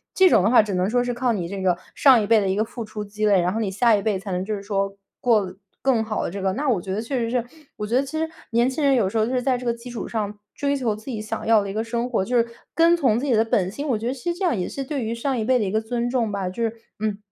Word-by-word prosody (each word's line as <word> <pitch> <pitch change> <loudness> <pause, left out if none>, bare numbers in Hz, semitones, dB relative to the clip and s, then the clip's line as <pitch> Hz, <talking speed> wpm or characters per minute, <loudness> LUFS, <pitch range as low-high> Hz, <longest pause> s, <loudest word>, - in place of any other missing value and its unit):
这 375 -1 +6
种 185 - +4
的 210 - +3
话， 250 - +8
只 205 -3 -3
能 180 +1 +1
说 245 +2 +2
是 245 - -1
靠 245 0 0
你 180 -5 -2
这 195 +2 -5
个 180 -2 +3 0.2
上 260 -5 +6
一 205 - -2
辈 225 0 +5
的 200 - 0
一 190 - +1
个 210 - +2
付 225 +1 -7
出 215 0 -6
积 210 +1 -3
累， 200 -3 +4
然 175 +1 +1
后 220 - -2
你 210 -4 -1
下 230 +3 +4
一 205 - 0
辈 205 -3 0
才 195 0 -7
能 180 +1 -2
就 215 - -2
是 200 - -6
说 195 -1 -2 0.2
过 225 -4 +3
得 185 0 -10 0.2
更 260 -4 +2
好 215 -1 -2
的 - - -2
这 200 - -5
个。 190 0 0
那 285 +4 -1
我 225 -7 +2
觉 190 +1 -4
得 210 - -1
确 255 +4 -3
实 230 -2 -1
是 245 -1 +1 0.3
我 210 - -3
觉 230 - 0
得 265 - +2
其 275 - -8
实 320 0 -1 0.2
年 235 +2 +3
轻 265 +4 -3
人 275 - +5
有 215 -7 +2
时 225 - -3
候 215 - +3
就 245 - -3
是 250 - +1
在 255 0 +1
这 250 - -8
个 235 - +1
基 235 +1 -10
础 240 -2 -5
上， 210 -2 -3 0.2
追 285 -1 0
求 235 -5 0
自 215 +1 -14
己 245 -5 -4
想 220 +1 -5
要 225 -2 +5
的 200 - -5
一 - - -6
个 220 +2 -1
生 235 +1 -2
活， 225 -6 +1
就 245 +5 0
是 235 0 +3 0.3
跟 335 +1 +5
从 260 -10 +2
自 270 - -3
己 270 - +2
的 220 0 +4
本 200 -5 +1
心， 280 +8 -5
我 240 - +2
觉 220 - -6
得 250 - 0
其 275 +6 -3
实 340 - -6
这 385 - 0
样 330 -10 +1
也 180 - -2
是 275 - -4
对 275 -2 -3
于 225 +1 -2
上 260 +2 -1
一 225 - -1
辈 255 +3 +3
的 215 - 0
一 190 - -2
个 215 +1 +1
尊 235 +1 -2
重 235 -4 0
吧， 200 -2 -2
就 185 +6 -5
是， 225 -1 0 0.3
嗯， 215 -1 -1
225 Hz, 380 characters per minute, -23 LUFS, 205-250 Hz, 0.3 s, 话